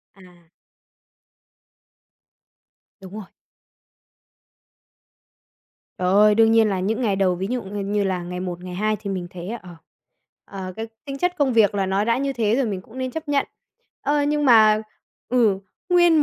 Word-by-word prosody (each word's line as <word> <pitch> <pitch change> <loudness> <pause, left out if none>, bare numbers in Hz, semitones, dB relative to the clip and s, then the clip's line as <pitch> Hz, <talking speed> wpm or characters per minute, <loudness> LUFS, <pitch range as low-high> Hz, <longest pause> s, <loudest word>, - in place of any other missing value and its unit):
À. 175 -3 -19 2.5
Đúng 190 0 -11
rồi. 215 -2 -7 2.7
Trời 180 - -1
ơi, 210 +2 +5
đương 225 0 +5
nhiên 225 -1 +5
là 190 -2 -1
những 220 +6 -1
ngày 210 -5 +1
đầu, 190 -2 +2
ví 190 +2 -3
dụ 250 0 -1
ư 190 - -10
như, 205 0 -5
như 205 +1 0
là 185 -2 -1
ngày 180 +1 -6
một, 180 -1 -5
ngày 180 -1 -7
hai 215 +2 0
thì 205 -2 -6
mình 185 -2 -3
thấy, 180 0 -8
ờ, 220 -6 -7 0.8
ờ, 185 -2 -7
cái 225 - -4 0.2
tính 275 -1 -6
chất 360 +4 0
công 275 -3 +2
việc 220 -3 +4
là 195 -1 0
nó 195 +2 +1
đã 230 +1 +1
như 275 0 -1
thế 225 -2 +1
rồi 270 -3 +1
mình 195 -3 -3
cũng 235 +6 -13
nên 255 0 -2
chấp 315 +2 -7
nhận. 280 -1 +1 0.6
Ơ, 290 0 +1
nhưng 295 0 0
mà 215 -3 +6 0.5
ừ, 225 -5 +3 0.3
nguyên 345 -3 +5
215 Hz, 175 wpm, -22 LUFS, 190-250 Hz, 2.7 s, mà